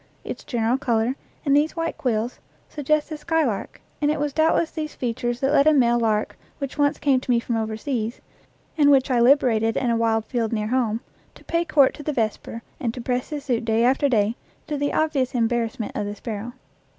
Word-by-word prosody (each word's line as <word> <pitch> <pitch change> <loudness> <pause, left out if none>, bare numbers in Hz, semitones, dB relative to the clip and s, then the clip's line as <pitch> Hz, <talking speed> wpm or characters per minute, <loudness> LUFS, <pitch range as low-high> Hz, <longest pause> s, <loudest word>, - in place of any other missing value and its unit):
Its - - -6
general 240 +1 0
color, 240 -2 +1 0.3
and 280 -1 +4
these 300 +2 +2
white 330 -1 -2
quills, 235 -1 -2 0.3
suggest 300 +1 0
the 310 - -5
skylark, 300 -9 -1 0.2
and 295 - +2
it 300 - 0
was 290 -1 -1
doubtless 320 +1 +2
these 305 -2 -5
features 240 0 -2
that 270 +1 +1
led 290 0 +4
a 310 - +6
male 240 -4 +3
lark 215 -2 0 0.2
which 275 -2 -5
once 290 0 +2
came 275 -3 +2
to 255 - -13
me 240 -1 +4
from 235 0 -3
overseas, 220 +1 -3 0.6
and 290 -1 +6
which 270 -1 +4
I 245 - +3
liberated 235 -3 +3
in 245 -3 +1
a - - +2
wide 225 -1 +1
field 230 -2 -2
near 215 -1 -1
home, 235 -3 0 0.3
to - - -16
pay 335 0 0
court 295 -4 +4
to - - -10
the 300 +1 -2
vesper 230 -1 -3 0.2
and 245 -6 -1
to - - -6
press 250 +1 -2
his 295 -2 -5
suit 240 -4 0
day 225 0 +2
after 270 +3 +3
day, 220 -2 +2 0.3
to 300 - -3
the 285 0 -1
obvious 280 -5 0
embarrassment 230 -1 -1
of 205 - -2
the 205 - -5
sparrow. 225 +2 -6
250 Hz, 210 wpm, -23 LUFS, 230-290 Hz, 0.6 s, a